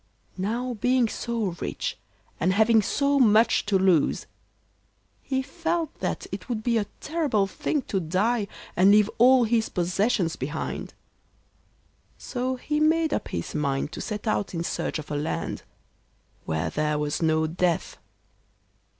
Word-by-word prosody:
Now 235 Hz, +6 st, -1 dB
being 250 Hz, +2 st, +2 dB
so 220 Hz, -5 st, -3 dB
rich, -, -, -3 dB, 0.4 s
and 185 Hz, +3 st, +2 dB
having 220 Hz, +2 st, +5 dB
so 280 Hz, +6 st, +1 dB
much 220 Hz, -3 st, +4 dB
to 200 Hz, -2 st, +3 dB
lose, 185 Hz, -5 st, +2 dB, 1.0 s
he 265 Hz, -1 st, -1 dB
felt 330 Hz, +1 st, -2 dB
that -, -, -2 dB
it -, -, -7 dB
would 220 Hz, -3 st, -2 dB
be 235 Hz, -1 st, +2 dB
a 205 Hz, -, -1 dB
terrible 295 Hz, -11 st, 0 dB
thing 270 Hz, +8 st, -2 dB
to 195 Hz, -, -1 dB
die 200 Hz, +6 st, 0 dB, 0.3 s
and 185 Hz, +3 st, +5 dB
leave 210 Hz, +1 st, +5 dB
all 255 Hz, +1 st, +7 dB
his 225 Hz, 0 st, +1 dB
possessions 180 Hz, 0 st, 0 dB
behind; 150 Hz, +5 st, -5 dB, 1.2 s
so 255 Hz, +1 st, -3 dB
he 300 Hz, +4 st, -2 dB
made 320 Hz, +1 st, +3 dB
up -, -, -2 dB
his 85 Hz, -1 st, -4 dB
mind 140 Hz, -1 st, -1 dB
to -, -, -6 dB
set 210 Hz, 0 st, -5 dB
out 205 Hz, -4 st, -1 dB
in 165 Hz, -, -2 dB
search -, -, -2 dB
of 155 Hz, -1 st, -8 dB
a -, -, -1 dB
land 150 Hz, +2 st, -3 dB, 0.8 s
where 80 Hz, +1 st, -1 dB
there 150 Hz, 0 st, 0 dB
was 150 Hz, +2 st, -2 dB
no 160 Hz, -1 st, +2 dB
death. 170 Hz, +1 st, -1 dB
210 Hz, 145 wpm, -26 LUFS, 170-250 Hz, 1.2 s, all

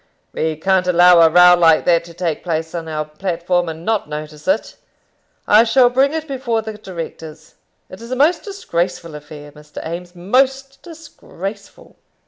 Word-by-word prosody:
"We 160 Hz, 0 st, -2 dB
can't 185 Hz, +3 st, 0 dB
allow 180 Hz, 0 st, +6 dB
a 165 Hz, -, +6 dB
row 180 Hz, +2 st, +7 dB
like 165 Hz, -2 st, +4 dB
that 170 Hz, -1 st, +3 dB
to 170 Hz, -1 st, -14 dB
take 170 Hz, -3 st, -3 dB
place 160 Hz, -2 st, -3 dB
on 165 Hz, -2 st, -5 dB
our 155 Hz, -1 st, -3 dB
platform 175 Hz, +2 st, -2 dB
and 160 Hz, +1 st, -8 dB
not 220 Hz, -2 st, -1 dB
notice 150 Hz, +1 st, -8 dB
it. 195 Hz, +4 st, -1 dB, 0.7 s
I 215 Hz, +2 st, +6 dB
shall 245 Hz, +1 st, +3 dB
bring 270 Hz, +3 st, +2 dB
it 315 Hz, 0 st, -4 dB
before 250 Hz, -5 st, -2 dB
the 220 Hz, 0 st, -6 dB
directors. 165 Hz, -5 st, -9 dB, 0.3 s
It's 185 Hz, -, -12 dB
a 255 Hz, -, -2 dB
most 310 Hz, +6 st, +2 dB
disgraceful 175 Hz, -, -4 dB
affair, 150 Hz, 0 st, -11 dB
Mr. 150 Hz, 0 st, -18 dB
Eames 175 Hz, +2 st, -7 dB
most 270 Hz, +8 st, 0 dB
disgraceful." 220 Hz, -, -10 dB
180 Hz, 160 wpm, -18 LUFS, 160-225 Hz, 0.7 s, row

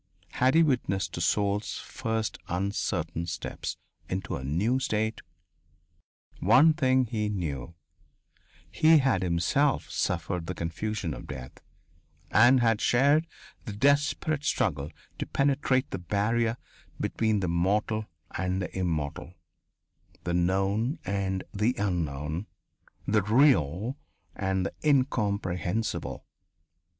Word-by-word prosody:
Had 130 Hz, +4 st, +2 dB
he 165 Hz, -, +7 dB
witnessed 95 Hz, -, 0 dB
a -, -, -3 dB
soul's 100 Hz, +4 st, 0 dB
first 110 Hz, -1 st, -3 dB
uncertain 90 Hz, -3 st, -2 dB
steps 85 Hz, -, -5 dB, 0.3 s
into 95 Hz, +1 st, -3 dB
a -, -, -6 dB
new 100 Hz, -, +1 dB
state? 110 Hz, -3 st, -1 dB, 1.2 s
One 130 Hz, -, +6 dB
thing 130 Hz, -4 st, +2 dB
he 105 Hz, -2 st, -2 dB
knew 80 Hz, -6 st, -4 dB, 1.0 s
he 160 Hz, +1 st, +5 dB
had 135 Hz, -9 st, +2 dB
himself 95 Hz, -, +1 dB
suffered 90 Hz, -1 st, -2 dB
the 90 Hz, -, -3 dB
confusion 85 Hz, +1 st, -3 dB
of -, -, -9 dB
death, 65 Hz, -2 st, -7 dB, 0.8 s
and 120 Hz, +3 st, +6 dB
had 115 Hz, -2 st, +2 dB
shared 145 Hz, +6 st, +3 dB, 0.4 s
the 110 Hz, -, -5 dB
desperate 145 Hz, +5 st, +2 dB
struggle 75 Hz, -, 0 dB, 0.3 s
to -, -, -3 dB
penetrate 140 Hz, -2 st, +1 dB
the -, -, -3 dB
barrier 110 Hz, +5 st, 0 dB, 0.4 s
between 110 Hz, -3 st, 0 dB
the 90 Hz, -, 0 dB
mortal 105 Hz, +5 st, 0 dB, 0.2 s
and 95 Hz, +1 st, -1 dB
the 90 Hz, -3 st, -5 dB
immortal, 85 Hz, -1 st, -3 dB, 0.9 s
the 85 Hz, -, -2 dB
known 95 Hz, -, +1 dB
and 95 Hz, -1 st, -1 dB
the 110 Hz, +5 st, +1 dB
unknown, 80 Hz, -3 st, -2 dB, 0.6 s
the 105 Hz, +1 st, +3 dB
real 110 Hz, -, +3 dB, 0.4 s
and 95 Hz, -1 st, -1 dB
the -, -, -3 dB
incomprehensible. 105 Hz, -, 0 dB
105 Hz, 110 wpm, -28 LUFS, 90-125 Hz, 1.2 s, he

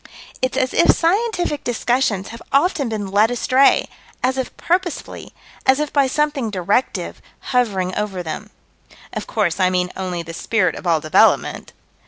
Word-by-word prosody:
It's 255 Hz, 0 st, -1 dB
as 260 Hz, -1 st, 0 dB
if -, -, +3 dB
scientific 350 Hz, -4 st, 0 dB
discussions 240 Hz, -4 st, 0 dB
have 230 Hz, 0 st, -10 dB
often 280 Hz, -2 st, +2 dB
been 205 Hz, -3 st, -4 dB
led 210 Hz, +3 st, +4 dB
astray 255 Hz, +3 st, +3 dB, 0.4 s
as 260 Hz, +1 st, +2 dB
if 260 Hz, -1 st, -4 dB
purposefully 350 Hz, -2 st, -2 dB, 0.3 s
as 265 Hz, +1 st, +3 dB
if 300 Hz, -1 st, -2 dB
by 280 Hz, -2 st, +3 dB
something 290 Hz, -3 st, 0 dB
directive, 200 Hz, +5 st, -1 dB, 0.3 s
hovering 195 Hz, -7 st, +1 dB
over 195 Hz, -3 st, -3 dB
them. 170 Hz, +6 st, -6 dB, 0.6 s
Of -, -, -5 dB
course 200 Hz, -5 st, 0 dB
I 185 Hz, -1 st, +4 dB
mean 180 Hz, 0 st, 0 dB
only 180 Hz, -2 st, -4 dB
the 165 Hz, 0 st, -8 dB
Spirit 185 Hz, -1 st, 0 dB
of 180 Hz, -, -7 dB
all 165 Hz, -2 st, +2 dB
Development. 155 Hz, 0 st, +2 dB
230 Hz, 155 wpm, -20 LUFS, 185-270 Hz, 0.6 s, led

